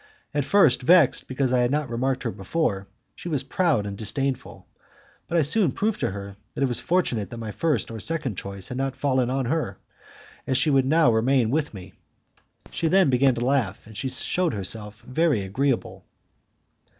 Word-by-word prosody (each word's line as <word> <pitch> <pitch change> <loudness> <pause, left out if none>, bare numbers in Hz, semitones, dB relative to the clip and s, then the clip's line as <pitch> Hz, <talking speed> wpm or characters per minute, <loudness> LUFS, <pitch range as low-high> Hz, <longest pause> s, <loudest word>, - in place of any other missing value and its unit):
At 145 -2 0
first, 150 -6 +4
vexed 160 +1 +4
because 130 -1 -1
I 125 - +3
had 120 0 +2
not 150 +1 0
remarked 130 +2 -1
her 115 - -1
before, 100 - -2 0.3
she 175 - -7
was 145 -5 -1
proud 140 - +1
and 100 -1 -5
disdainful; 135 +5 -3 0.6
but 170 - 0
I 165 - +4
soon 165 +2 +3
proved 215 0 -1
to 120 - 0
her 100 0 -7 0.2
that - - -1
it - - +3
was 120 - 0
fortunate 125 - 0
that 120 - -8
my 110 -2 -5
first 145 -4 -1
or 110 - -6
second 145 -5 -3
choice 100 0 -5
had 125 - -4
not 135 -1 -2
fallen 130 -2 +1
on 135 0 -1
her, 160 +6 -2 0.7
as 130 - +1
she 155 - +2
would 135 -2 +3
now 155 -3 +4
remain 120 +1 +2
longer - - -2
with 150 -6 -1
me. 95 0 -10 0.8
She 165 - -1
then 185 -3 +4
began 130 0 +3
to 120 +1 -2
laugh, 130 -8 0
and 110 - -13
shewed 135 - -1
herself 105 +2 -6
very 145 -3 +1
agreeable. 125 +7 -2
130 Hz, 190 wpm, -24 LUFS, 115-150 Hz, 0.8 s, first